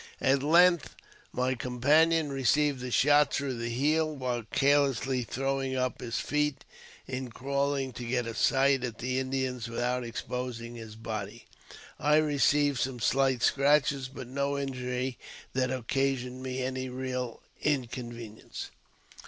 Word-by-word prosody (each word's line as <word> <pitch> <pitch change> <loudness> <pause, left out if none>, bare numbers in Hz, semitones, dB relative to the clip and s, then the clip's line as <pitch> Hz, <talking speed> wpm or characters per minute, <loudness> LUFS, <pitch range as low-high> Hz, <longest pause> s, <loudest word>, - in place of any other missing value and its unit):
At 135 +1 +3
length 170 +3 +4 0.4
my 130 +1 0
companioi 145 +6 +2
received 135 +1 +2
a 125 - -3
shot 145 +3 +4
through 135 -4 -2
the 115 0 -2
heel, 155 +5 +1
while 125 -3 -2
carelessly 135 -2 +2
throwing 135 +2 -2
uj 130 -1 -1
his 115 -2 -3
feet 150 +1 -1 0.4
in 130 -1 -4
crawling 140 +1 -1
to 120 - -7
get 120 0 -1
a 115 - -4
sight 135 +2 +3
at 120 -3 -4
the 130 +2 -1
Indians 130 -2 -2
without 120 +2 -1
ex 115 0 -5
posing 120 -2 -5
his 110 -2 -9
body. 110 -3 -6 0.5
I 150 +1 +3
received 145 -2 +3
some 130 -1 -2
slight 130 +1 +2
scratches, 140 -1 +3
but 130 -1 -8
n( 130 +3 -10
injury 130 -3 -2 0.3
that 130 -1 +1
occasioned 130 0 -1
me 130 0 -3
any 130 0 -3
real 125 -2 -4 0.2
inconvenience. 120 -5 -4
130 Hz, 135 wpm, -29 LUFS, 125-140 Hz, 0.5 s, length